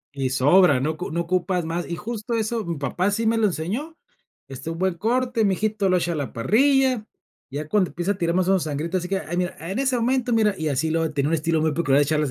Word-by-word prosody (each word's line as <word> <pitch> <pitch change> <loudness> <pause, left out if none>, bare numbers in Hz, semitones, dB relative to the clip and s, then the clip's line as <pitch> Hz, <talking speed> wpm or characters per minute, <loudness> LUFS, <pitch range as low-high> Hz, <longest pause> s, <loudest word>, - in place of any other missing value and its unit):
Y 135 -2 -1
sobra, 145 +3 +4
no 150 +5 0
ocu 160 - -6
no 170 +2 -1
ocupas 180 0 -1
más. 170 +2 -3
Y 170 - -2
justo 230 +3 -4
eso, 225 0 -1
mi 170 -2 -3
papá 160 +6 -2
así 205 +3 0
me 225 +1 +2
lo 220 -1 +3
enseñó, 215 - -4 0.5
este, 135 +4 -7
un 165 - -5
buen 190 -1 +1
corte, 240 +4 0
mi 195 - +3
hijito, 210 -1 0
lo 185 - +4
echa 175 0 -1
a - - -2
la 145 -4 -4
parrilla, 255 - +2 0.5
ya 145 +2 -5
cuando 195 0 +2
empieza 175 +4 -1
a 195 - -9
tirar 170 -2 0
mas, 185 0 +1
o, 195 - +4
menos 190 - +2
sangrita, 155 +4 -2
así 180 -1 -2
que, 195 0 0
ay, 175 -2 -5
mira, 180 0 -1
en 185 +8 -4
ese 265 -2 +1
momento. 245 +1 0
Mira, 215 -3 +3
y 160 -2 -2
así 150 +3 0
luego 165 -1 0
tenía 140 0 0
un 165 - +1
estilo 160 0 0
muy 155 -1 +1
peculiar 145 -4 +2
de 145 - +5
echarlas, 150 -1 0
180 Hz, 265 wpm, -23 LUFS, 160-215 Hz, 0.5 s, de